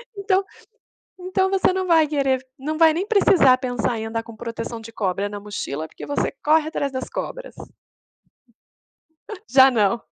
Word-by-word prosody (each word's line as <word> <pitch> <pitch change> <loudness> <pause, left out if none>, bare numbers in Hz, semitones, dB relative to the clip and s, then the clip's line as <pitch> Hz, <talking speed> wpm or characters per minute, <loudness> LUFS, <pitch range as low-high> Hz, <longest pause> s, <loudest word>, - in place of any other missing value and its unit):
Então, 395 -1 +1 0.8
então 380 +1 0
você 385 -1 +2
não 375 0 -2
vai 320 -3 +4
querer 270 -3 0
não 305 +4 -4
vai 320 -1 +5
nem 365 +5 -2
precisar 360 - +5
pensar 245 -3 -2
em 220 - -4
andar 225 0 -3
com 230 -1 -12
proteção 230 0 -6
de 230 +1 -11
cobra 200 -1 -2
na 205 0 -7
mochila, 160 -7 -5
porque - - -11
você 285 - -1
corre 310 +1 +3
atrás 280 -3 -2
das 260 -1 -5
cobras. - - -6 1.9
Já 265 +1 +7
não. 215 -1 +1
265 Hz, 160 wpm, -22 LUFS, 230-330 Hz, 1.9 s, Já